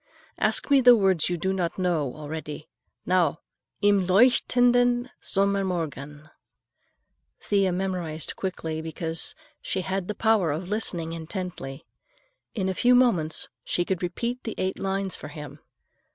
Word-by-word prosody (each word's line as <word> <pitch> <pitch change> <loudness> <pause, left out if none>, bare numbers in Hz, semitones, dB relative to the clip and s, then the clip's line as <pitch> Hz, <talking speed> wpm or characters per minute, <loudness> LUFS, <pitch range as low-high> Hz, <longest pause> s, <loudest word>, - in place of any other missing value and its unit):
Ask - - +1
me 275 -1 +6
the 245 -1 +8
words 190 -7 +2
you 175 - -1
do 190 +3 -1
not 175 -3 -2
know 165 -8 0
already. 155 0 -7 0.4
Now: 175 -4 +2 0.4
Im 205 -1 +5
leuchtenden 245 +3 +4
Sommermorgen." 170 -7 -1 1.1
Thea 195 -2 +1
memorized 180 -4 -3
quickly 160 -4 -4
because 160 +1 -3 0.3
she 190 - -2
had 190 0 -3
the 210 - -3
power 215 -7 +2
of 170 +5 -4
listening 175 -6 -2
intently. 165 -4 -6 0.7
In 190 -4 -1
a 190 - 0
few 245 +6 +4
moments 185 -12 +2 0.2
she 175 - -1
could 185 -1 -2
repeat 235 +8 -3
the 225 - -4
eight 185 0 -2
lines 195 0 -1
for - - -8
him. 150 0 -9
185 Hz, 135 wpm, -26 LUFS, 160-200 Hz, 1.1 s, the